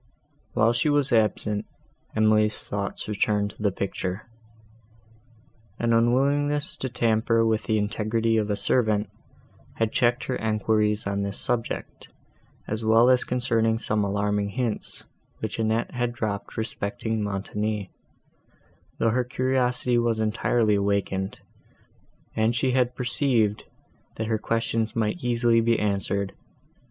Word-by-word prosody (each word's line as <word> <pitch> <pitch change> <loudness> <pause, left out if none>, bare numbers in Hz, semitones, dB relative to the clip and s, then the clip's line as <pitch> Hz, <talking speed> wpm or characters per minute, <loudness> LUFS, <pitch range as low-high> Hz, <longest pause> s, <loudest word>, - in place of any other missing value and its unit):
While 115 +2 +3
she 120 +6 +1
was 145 -2 +2
absent, 105 -2 +1 0.5
Emily's 110 0 +3
thoughts 100 -1 -4
returned 105 0 0
to - - -15
the 105 -1 +2
picture; 95 +1 -4 1.5
an 115 0 +1
unwillingness 140 +6 +2
to 130 - -3
tamper 115 -1 +2
with 110 -1 +1
the 110 - +1
integrity 110 +2 0
of 105 -1 0
a 105 - +1
servant, 105 0 +1 0.7
had 115 -1 0
checked 120 +2 +2
her 130 - -2
enquiries 110 -1 +1
on 100 0 -1
this 100 0 -3
subject, 120 -2 -3 0.6
as 110 +1 -3
well 115 +3 +5
as 125 -1 +3
concerning 115 -2 +1
some 105 -2 0
alarming 100 0 0
hints, 115 0 -3 0.3
which 110 +1 -4
Annette 110 +1 0
had 120 -1 -1
dropped 105 -4 -4
respecting 110 0 -2
Montoni; 105 0 -3 1.1
though 115 - +2
her 125 +2 +1
curiosity 125 -1 +1
was 115 -2 +1
entirely 110 0 +1
awakened, 100 -1 -1 1.0
and 110 +2 +2
she 130 +2 +1
had 125 -1 +1
perceived, 120 -4 +1 0.5
that 110 - -3
her 110 0 0
questions 115 0 -1
might 115 +9 -1
easily 120 -1 +3
be 115 0 +2
answered. 100 -1 -1
110 Hz, 125 wpm, -25 LUFS, 105-120 Hz, 1.5 s, well